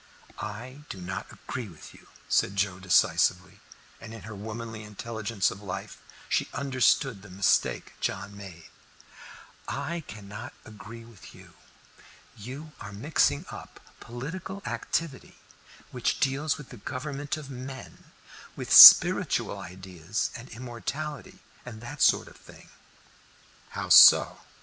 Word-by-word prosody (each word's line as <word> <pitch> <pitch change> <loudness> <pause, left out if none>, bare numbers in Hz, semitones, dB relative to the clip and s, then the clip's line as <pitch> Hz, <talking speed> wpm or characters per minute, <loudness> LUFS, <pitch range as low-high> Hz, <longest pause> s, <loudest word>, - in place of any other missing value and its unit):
"I 120 +7 -8
do 95 - -7
not 90 +1 -6
agree 125 -3 -7
with 80 -4 -14
you," - - -19 0.2
said 100 - +1
Joe 95 -1 -1
decisively, 90 +1 +1 0.4
and 115 0 -10
in 115 - -11
her 110 - -9
womanly 110 +2 -7
intelligence 105 -1 -3
of 100 - -10
life 95 -3 -7 0.3
she - - -1
understood 135 -4 +1
the 100 - -14
mistake 95 +2 0
John 100 +1 -4
made. 90 -5 -12 1.0
"I 170 0 -4
cannot 105 +2 -9
agree 115 +1 -12
with 115 -4 -15
you. - - -16 0.8
You 135 +9 -9
are 100 - -8
mixing 115 +11 0
up - - -11 0.2
political 185 - -8
activity, 165 -5 -4 0.6
which - - -2
deals 140 +3 0
with 150 - -12
the 125 - -11
government 140 +5 -5
of 145 -3 -10
men, 130 0 -10 0.5
with - - -3
spiritual - - +9
ideas 90 +1 -5
and 120 +2 -10
immortality, 130 +4 -7 0.2
and 115 -3 -10
that 135 +4 -8
sort - - +3
of - - -15
thing." - - -17 1.0
"How - - -6
so?" - - +8
115 Hz, 125 wpm, -27 LUFS, 100-135 Hz, 1.0 s, spiritual